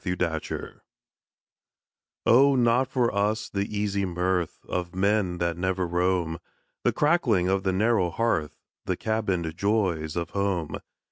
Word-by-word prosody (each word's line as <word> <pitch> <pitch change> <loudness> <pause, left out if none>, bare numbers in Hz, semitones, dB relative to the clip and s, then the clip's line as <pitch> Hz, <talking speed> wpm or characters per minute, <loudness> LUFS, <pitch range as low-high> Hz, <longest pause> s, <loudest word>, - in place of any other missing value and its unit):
THE 90 - -1
BUCCANEERS. 80 -3 -3 1.4
Oh, 135 +3 +6
not 125 +1 +3
for 125 -3 0
us 105 +2 0
the 100 0 -2
easy 100 -1 -1
mirth 90 -1 -1
Of 90 0 -3
men 100 -2 +1
that 85 -1 -1
never 95 0 0
roam! 90 -1 0 0.4
The - - +3
crackling 130 - +2
of 95 +1 +1
the 95 -1 0
narrow 100 -1 +2
hearth, 85 -6 -1 0.3
The - - -1
cabined 95 -7 -1
joys 90 -6 0
of 85 -1 -3
home! 100 -5 -1
95 Hz, 135 wpm, -26 LUFS, 90-110 Hz, 1.4 s, Oh